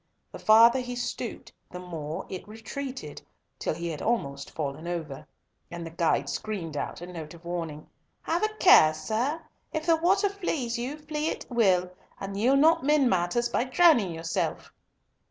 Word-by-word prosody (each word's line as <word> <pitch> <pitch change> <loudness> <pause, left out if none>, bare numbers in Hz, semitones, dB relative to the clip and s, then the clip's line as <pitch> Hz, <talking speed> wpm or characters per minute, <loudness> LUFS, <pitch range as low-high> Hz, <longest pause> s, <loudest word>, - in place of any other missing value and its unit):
The - - -9
farther 230 +4 +6
he 245 -1 -5
stooped, 240 0 -5 0.2
the 180 - -8
more 165 -1 -6
it 185 +1 -7
retreated, 225 - -7 0.4
till - - -1
he 170 +1 -4
had 155 -3 -5
almost 140 -12 -1
fallen 155 +2 -5
over, 160 -6 -5 0.4
and 170 0 -6
the 165 - -7
guide 165 0 +1
screamed 180 -8 -4
out 145 - -4
a - - -5
note 170 -3 -8
of 170 0 -17
warning, 165 -3 -5 0.4
"Have 335 +2 0
a 430 - +2
care, 155 - +7
sir! 230 - -1 0.3
If 315 0 -3
the 330 -1 +4
water 390 +5 +3
flees 315 -12 -2
you, 265 +5 -4
flee 305 0 -3
it - - -3
will, 185 -6 +3 0.3
and 195 0 -5
ye'll 245 +7 +3
not 315 0 +4
mend 285 -3 +3
matters 185 +7 +1
by - - +1
drowning 255 - +4
yourself." 165 0 -3
215 Hz, 170 wpm, -27 LUFS, 170-275 Hz, 0.4 s, care